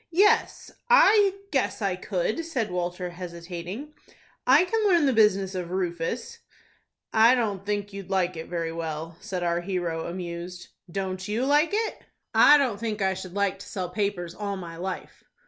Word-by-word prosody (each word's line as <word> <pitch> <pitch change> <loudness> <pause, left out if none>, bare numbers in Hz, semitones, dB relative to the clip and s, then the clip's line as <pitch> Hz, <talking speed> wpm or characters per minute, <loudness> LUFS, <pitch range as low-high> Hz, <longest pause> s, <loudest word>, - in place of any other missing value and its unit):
"Yes, 415 +6 +2 0.2
I 415 -4 +6 0.2
guess 265 -3 0
I 195 -4 0
could," 190 - -2
said 260 - -2
Walter, 180 0 -3
hesitating, 175 - -7 0.5
"I 280 +8 +6
can 445 +3 0
learn 340 -5 +4
the 270 - +3
business 200 -3 +3
of 180 -2 -4
Rufus." 185 - -3 0.7
"I 230 +3 +6
don't 205 -6 -1
think 205 -1 -2
you'd 195 -2 -8
like 185 -2 +1
it 160 0 -6
very 170 -2 -3
well," 165 0 -5
said 180 -2 -4
our 170 0 0
hero, 175 -3 -2
amused. 175 0 -6 0.2
"Don't 185 0 -3
you 220 +5 0
like 295 +4 +4
it?" 440 +1 -1 0.3
"I 295 - +8
don't 250 -8 0
think 220 -2 -3
I 190 0 +2
should 185 0 -8
like 200 -1 0
to - - -10
sell 185 -4 -3
papers 180 -3 -2
all 200 -1 -4
my 170 -3 -7
life." 185 +1 -6
190 Hz, 165 wpm, -26 LUFS, 175-235 Hz, 0.7 s, I